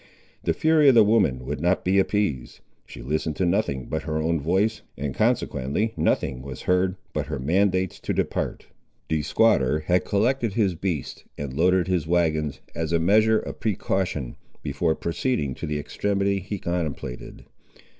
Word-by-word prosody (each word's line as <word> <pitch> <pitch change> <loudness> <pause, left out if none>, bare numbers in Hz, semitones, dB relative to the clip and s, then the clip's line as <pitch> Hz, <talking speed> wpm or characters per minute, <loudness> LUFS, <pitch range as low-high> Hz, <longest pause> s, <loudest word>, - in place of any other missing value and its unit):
The - - 0
fury 155 -2 +5
of 130 - +5
the 115 - +8
woman 95 - +2
would 75 +2 -4
not 90 +2 +1
be 95 +2 +3
appeased. 95 - -1 0.3
She - - -10
listened 75 +3 -2
to 95 - 0
nothing 85 - 0
but 80 - -3
her 80 -1 -3
own 80 +1 0
voice, 95 +9 +1 0.2
and 70 -1 -3
consequently 70 - 0
nothing 65 -1 0
was 65 -2 -8
heard 90 +1 +2 0.2
but - - -2
her - - -3
mandates 95 +6 +1
to - - -3
depart. - - -2 0.4
The 80 -1 +1
squatter 75 - +2
had 90 +3 +1
collected 115 +2 +1
his 100 -4 +2
beasts 85 -5 -4
and 70 -3 -5
loaded 90 +4 +2
his 90 -4 0
wagons, 80 -4 0
as 80 -1 -3
a 85 - +3
measure 110 +6 +4
of - - -5
precaution, 95 - -2 0.3
before 80 +4 0
proceeding 85 - -1
to - - -6
the 75 0 -2
extremity 100 +6 -1
he 100 +2 -5
contemplated. 80 -8 -4
85 Hz, 165 wpm, -24 LUFS, 75-100 Hz, 0.4 s, the